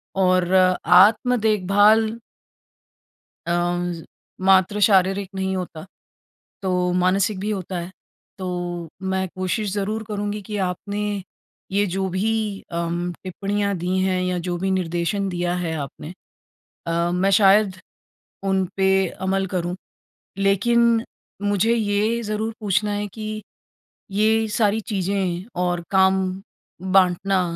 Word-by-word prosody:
और 185 -1 +2 0.3
आत्म-देखभाल 215 +1 +4 1.4
अम, 175 +1 0
ज़ 165 -1 -7 0.4
मात्र 190 +2 +4
शारीरिक 195 -1 +2
नहीं 190 0 -1
होता 170 -3 -6 0.8
तो 190 - -1 0.2
मानसिक 185 +2 +1
भी 210 +2 -2
होता 190 -3 -3
है। 170 +1 -6 0.5
तो 185 - -5 0.7
मैं 190 0 0
कोशिश 185 +2 -2
ज़रूर 210 +2 -2
करूँगी 205 0 -3
कि 210 - -3
आपने 200 +3 -4 0.7
ये 200 +1 +2
जो 190 0 -1
भी 195 +5 0 0.4
अम, 170 +1 -2
टिप्पणियाँ 200 +2 -2
दी 180 +2 -1
हैं 185 -1 +1
या 180 -1 -1
जो 175 - -1
भी 190 +2 -1
निर्देशन 185 +2 -1
दिया 175 0 -1
है 165 -2 -2
आपने 150 +3 -7 0.7
अ, 170 +1 0
मैं 185 +2 +2
शायद 195 -1 +4 0.7
उन 190 -1 +1
पे 190 0 +3 0.2
अमल 195 0 +1
करूँ। 175 0 -1 0.6
लेकिन 230 +4 +3 0.4
मुझे 205 +3 +2
ये 215 +1 0
ज़रूर 215 +1 -3
पूछना 210 0 0
है 205 0 -2
कि 215 -1 -5 0.7
ये 220 +2 +2
सारी 215 -1 +2
चीज़ें 185 -2 -1 0.2
और 175 -1 -1
काम 190 0 +4 0.8
बाँटना 190 +1 +3
190 Hz, 120 wpm, -22 LUFS, 180-210 Hz, 1.4 s, आत्म-देखभाल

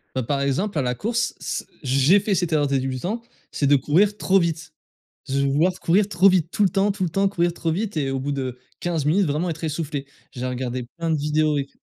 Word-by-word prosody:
Bah, 130 - 0
par 140 +3 -1
exemple, 155 +7 -1
à - - +2
la 125 -1 0
course, 230 - -1
c - - -4 0.2
j'ai 135 +9 +4
fait 200 -1 0
cette 175 -2 -1
erreur 145 -2 +2
de 135 -1 +1
débutant, 135 - -3 0.3
c'est 145 - -1
de 140 0 +6
courir 195 +10 +2
trop 195 +1 +3
vite. 160 -2 -2 0.6
Je 140 +1 0
vais 140 - +2
vouloir 155 +7 +3
courir 195 +4 +2
trop 190 +1 +5
vite, 180 -3 +1
tout 210 - +1
le 190 - +4
temps, 195 +3 +2
tout 195 -1 -3
le 175 - 0
temps, 195 +3 +1
courir 175 -3 0
trop 165 -2 -2
vite 200 +2 -2
et 140 -3 0
au 135 - -1
bout 140 +2 -2
de 130 -2 -4 0.2
15 165 -4 -1
minutes, 185 +6 +3
vraiment, 155 +5 -1
être 160 0 -5
essoufflé. 150 -3 -3 0.3
J'ai 125 0 -5
regardé 125 0 -3
plein 165 -1 -1
de - - +3
vidéos 150 0 +1
et 140 - -1
tout. - - -33
160 Hz, 245 wpm, -23 LUFS, 140-185 Hz, 0.6 s, de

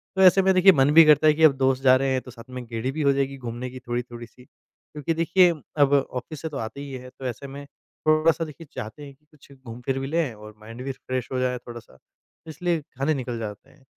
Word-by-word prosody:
तो 190 - +1
ऐसे 190 +1 +7
में 190 0 +3
देखिए 185 +1 +7
मन 135 -2 +3
भी 165 +1 +9
करता 155 0 +5
है 155 - +6
कि 160 +2 -1
अब 155 -3 +7
दोस्त 130 0 +1
जा 130 -1 +7
रहे 135 +1 0
हैं 130 -1 0
तो 125 - -12
साथ 115 -1 -12
में 125 -1 -7
गेड़ी 115 +2 -3
भी 155 +3 -4
हो 140 -1 +4
जाएगी 135 0 -2
घूमने 120 0 -6
की 130 +1 -10
थोड़ी-थोड़ी 120 -1 -5
सी। 125 - -19
क्योंकि 150 +4 -7
देखिए 170 +3 +4 0.3
अब 145 -1 +4
ऑफिस 135 +1 -2
से 160 - -4
तो 145 - -6
आते 115 +4 -6
ही 140 - -8
है 125 0 -8
तो 130 - -12
ऐसे 125 +2 -5
में 140 +1 -9
थोड़ा 155 +3 0
सा 165 +1 -4
देखिए 155 +1 -12
चाहते 110 +7 -7
हैं 140 - -12
कि 150 - -39
कुछ 145 -2 -21
घूम 130 -4 -11
फ़िर 135 0 -1
भी 135 - -4
लें 155 -4 -1
और 105 0 -13
माइंड 115 +3 -10
भी 135 - -8
रिफ्रेश 130 -2 -4
हो 130 - -1
जाए 125 0 0
थोड़ा 120 -1 -10
सा 110 - -20 0.5
इसलिए 165 +1 -2 0.2
खाने 140 +4 +1
निकल 125 -4 -4
जाते 105 -2 -7
हैं। 140 - -24
135 Hz, 260 wpm, -24 LUFS, 125-155 Hz, 0.5 s, भी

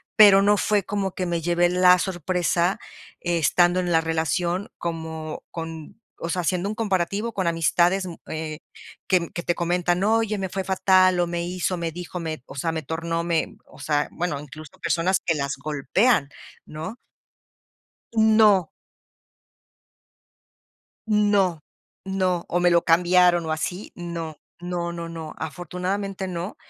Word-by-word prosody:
pero 200 -3 +8
no 205 +1 +4
fue 205 0 +2
como 195 -1 -2
que 185 - -3
me 170 -1 -1
llevé 175 +1 +2
la 180 0 +5
sorpresa 180 0 0 0.4
estando 175 +1 +2
en 180 -1 -1
la 165 -1 +4
relación 170 +4 -1
como 160 -2 -5
con 165 +4 -8 0.2
o - - -3
sea, 180 +1 0
haciendo 180 +2 -1
un 210 - -3
comparativo 205 +1 -1
con 190 -3 -1
amistades, 170 +3 +2
mm, 170 - -7 0.2
eh, 155 -1 -4 0.5
que 180 -3 +2
que 175 - -5
te 175 - 0
comentan: 175 +1 0
"Oye, 220 0 +2
me 190 -1 -3
fue 195 +1 -3
fatal, 185 -1 +4
o 175 - +1
me 170 0 -3
hizo, 180 +1 -2
me 170 -1 -3
dijo, 180 +1 -6
me 160 -3 -4
o - - -11
sea, 165 +4 -1
me 160 - -2
tornó, 165 +3 -3
me", 170 -1 -1
o - - -17
sea, 150 -1 0
bueno, 175 -4 -2
incluso 150 +1 -11
personas 180 +3 +1
que 165 - +1
las 140 -2 -2
golpean, 155 - +1 0.4
¿no? 160 +9 -7 1.2
No. 215 -5 +5 2.4
No, 205 -6 +2 0.4
no. 185 -2 0
O 175 - 0
me 175 0 +4
lo 170 -1 +4
cambiaron 175 0 +4
o 160 - -1
así, 175 +5 -4
no 170 -3 -6 0.2
no 175 -1 -3
no 170 -1 -6
no, 165 -2 -7
afortunadamente, 180 +5 -4
no. 180 +2 -5
175 Hz, 150 wpm, -24 LUFS, 165-190 Hz, 2.4 s, pero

